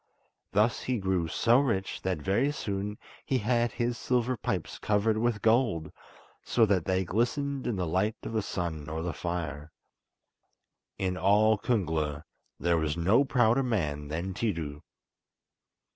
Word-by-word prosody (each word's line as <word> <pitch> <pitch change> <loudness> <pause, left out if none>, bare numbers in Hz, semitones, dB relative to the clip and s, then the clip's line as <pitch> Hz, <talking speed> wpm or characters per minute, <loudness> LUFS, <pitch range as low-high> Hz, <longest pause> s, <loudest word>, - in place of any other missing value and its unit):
Thus 105 +4 +2
he 130 -1 -1
grew 95 -4 0
so 115 +9 +3
rich 110 -9 -1
that 95 -2 -1
very 120 +10 +2
soon 105 -5 -3 0.3
he 130 - 0
had 120 +1 +1
his 120 -1 -1
silver 125 0 +1
pipes - - -3
covered 105 +1 +2
with 115 -2 0
gold, 110 -10 +2 0.5
so 115 - +3
that 95 -5 +1
they 95 0 +1
glistened 135 - -1
in 120 - 0
the 90 -2 -1
light 95 +7 0
of - - -5
the 110 - +1
sun 80 -6 -4
or 80 +1 -3
the 85 -1 -2
fire. 80 -1 -4 1.3
In 95 -1 -1
all 105 +3 +4
Kungla 80 - -1 0.4
there 85 -1 +2
was 80 0 -1
no 100 +11 +4
prouder 125 -2 +3
man 75 - -1
than 85 +6 -3
Tiidu. 80 -9 -3
100 Hz, 145 wpm, -29 LUFS, 85-120 Hz, 1.3 s, all